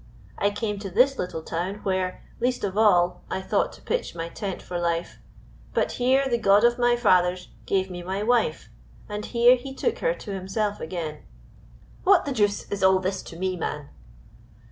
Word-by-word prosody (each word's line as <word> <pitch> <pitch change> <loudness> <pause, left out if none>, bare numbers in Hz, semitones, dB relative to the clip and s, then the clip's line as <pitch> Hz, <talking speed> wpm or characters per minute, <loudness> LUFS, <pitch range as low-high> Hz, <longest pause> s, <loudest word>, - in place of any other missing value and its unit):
I 200 - +3
came 205 0 -3
to 200 -1 -5
this 255 +8 +3
little 170 -3 -4
town, 175 +5 -3
where, 185 -1 -1 0.2
least 245 +1 0
of 195 -2 -2
all, 180 -5 +3
I - - -2
thought 190 - 0
to - - -16
pitch 485 - -2
my 165 0 -4
tent 195 0 -5
for 175 -1 -5
life, 170 0 -2 0.6
but - - +1
here 265 +2 +2
the 240 -2 0
God 200 0 +5
of 240 +1 +4
my 240 0 +4
fathers 180 -6 +2 0.2
gave 190 -1 0
me 175 -1 -6
my 190 +3 -3
wife, 225 -8 +1 0.4
and 210 0 -5
here 240 +2 +5
He 265 +2 -8
took 470 - -1
her - - +1
to 205 - -7
Himself 200 +2 -2
again 160 -3 -5 0.4
" - - -25
"What - - +5
the 285 - -2
deuce 205 -5 0
is 200 - -3
all 190 0 +5
this 190 +1 -2
to - - -11
me, 185 +1 -1
man?" 150 -4 -4
195 Hz, 190 wpm, -25 LUFS, 180-235 Hz, 0.6 s, God